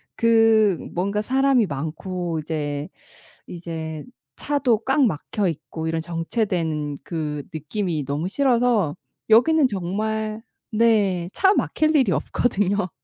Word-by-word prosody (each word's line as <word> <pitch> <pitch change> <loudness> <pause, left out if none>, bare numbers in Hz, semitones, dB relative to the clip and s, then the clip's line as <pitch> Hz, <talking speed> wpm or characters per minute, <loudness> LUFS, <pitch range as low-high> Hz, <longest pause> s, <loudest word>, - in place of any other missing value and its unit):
그 225 -4 +4 0.2
뭔가 200 +4 -1
사람이 265 -1 +3
많고 165 +3 -4
이제, 145 -2 -3 0.6
이제 160 -3 -6 0.3
차도 275 -6 +1
꽉 270 +2 +3
막혀 195 +2 -1
있고 160 +1 -6
이런 160 0 -1
정체된 165 - -2
그 150 -4 -4
느낌이 155 -1 -3
너무 145 +5 -2
싫어서 240 - +2 0.3
여기는 270 +6 +5
정말 215 +3 -3 0.3
네 205 -6 +2
차 385 +1 +4
막힐 310 -5 +1
일이 255 -9 +4
없거든요. 195 +4 0
190 Hz, 220 characters per minute, -23 LUFS, 160-225 Hz, 0.6 s, 여기는